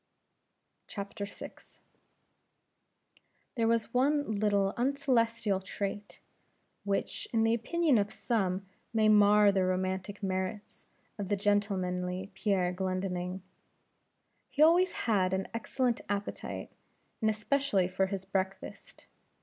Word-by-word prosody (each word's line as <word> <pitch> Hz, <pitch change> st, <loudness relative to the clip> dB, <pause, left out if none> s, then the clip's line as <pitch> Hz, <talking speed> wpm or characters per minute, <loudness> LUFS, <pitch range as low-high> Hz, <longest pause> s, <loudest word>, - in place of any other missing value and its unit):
VI. 200 Hz, -1 st, -5 dB, 2.4 s
There 230 Hz, -2 st, +1 dB
was 230 Hz, 0 st, +1 dB
one 270 Hz, -4 st, +1 dB
little 200 Hz, -1 st, +2 dB
uncelestial 230 Hz, -6 st, +1 dB
trait, 205 Hz, +2 st, -5 dB, 0.6 s
which, 200 Hz, -1 st, -2 dB
in 225 Hz, -1 st, +2 dB
the 225 Hz, 0 st, +3 dB
opinion 285 Hz, +3 st, +2 dB
of 205 Hz, +1 st, -1 dB
some, 195 Hz, -5 st, -1 dB, 0.3 s
may 215 Hz, -1 st, +4 dB
mar 210 Hz, 0 st, +6 dB
the 190 Hz, -1 st, +1 dB
romantic 190 Hz, +2 st, -2 dB
merits 190 Hz, +2 st, -4 dB, 0.3 s
of 200 Hz, -, -3 dB
the 205 Hz, +1 st, 0 dB
gentlemanly 190 Hz, -2 st, -1 dB
Pierre 190 Hz, -3 st, 0 dB
Glendinning. 185 Hz, 0 st, -3 dB, 1.1 s
He 295 Hz, -, +3 dB
always 345 Hz, +3 st, +5 dB
had 190 Hz, -5 st, +1 dB
an 190 Hz, 0 st, -1 dB
excellent 240 Hz, +1 st, -1 dB
appetite, 205 Hz, 0 st, -4 dB, 0.5 s
and 220 Hz, -, +3 dB
especially 215 Hz, -2 st, +1 dB
for 190 Hz, +1 st, 0 dB
his 190 Hz, -1 st, -4 dB
breakfast. 190 Hz, 0 st, -4 dB
205 Hz, 105 wpm, -31 LUFS, 190-230 Hz, 2.4 s, mar